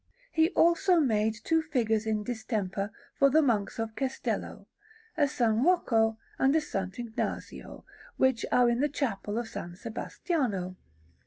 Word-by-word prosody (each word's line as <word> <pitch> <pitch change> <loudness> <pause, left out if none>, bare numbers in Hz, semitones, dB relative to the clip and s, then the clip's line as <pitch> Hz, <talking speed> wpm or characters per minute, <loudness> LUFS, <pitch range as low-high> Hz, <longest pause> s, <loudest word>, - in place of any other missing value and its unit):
He 320 +1 +3
also 345 +1 +4
made 220 -6 +2
two 325 0 +2
figures 225 -8 0
in 215 -1 0
distemper 205 -4 -3 0.2
for 275 - +4
the 310 +3 +4
Monks 225 -3 0
of 225 -1 -3
Cestello, 265 -1 -3 0.5
a 320 - -2
S. 295 - -11
Rocco 225 -2 +3 0.2
and 270 +3 +4
a - - +6
S. 305 -1 -4
Ignazio, 195 +4 -4 0.3
which 260 -3 +2
are 250 -1 +5
in 235 0 +1
the 295 +2 +2
Chapel 220 -7 -2
of 235 -1 -4
S. 175 +1 -6
Sebastiano. 225 - -2
235 Hz, 145 wpm, -29 LUFS, 215-285 Hz, 0.5 s, a